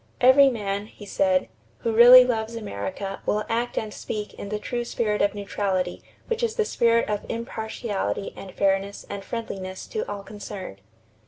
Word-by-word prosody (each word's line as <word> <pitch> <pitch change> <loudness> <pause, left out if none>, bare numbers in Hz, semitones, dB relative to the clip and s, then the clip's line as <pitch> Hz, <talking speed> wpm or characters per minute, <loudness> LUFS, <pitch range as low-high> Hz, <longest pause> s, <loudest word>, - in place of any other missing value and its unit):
"Every 270 +2 +7
man," 205 -4 -3
he 210 - -13
said, 190 -2 +1 0.3
"who 230 - 0
really 245 +2 +10
loves 225 -2 -2
America 195 - -5
will 210 0 +1
act 235 +2 -1
and 215 -1 -2
speak 210 -1 -5
in 200 - -8
the 210 - -1
true 240 +3 -3
spirit 215 -3 -1
of 205 +1 +2
neutrality 195 -3 -2 0.2
which 465 0 -2
is 465 -2 0
the 440 - +1
spirit 230 - +2
of 210 -1 -2
impartiality 220 -3 -3
and 190 - -9
fairness 195 +1 0
and 200 -1 -5
friendliness 190 -4 -5
to 440 - -2
all 200 -1 -5
concerned.... 195 - -8
210 Hz, 165 wpm, -25 LUFS, 195-235 Hz, 0.3 s, really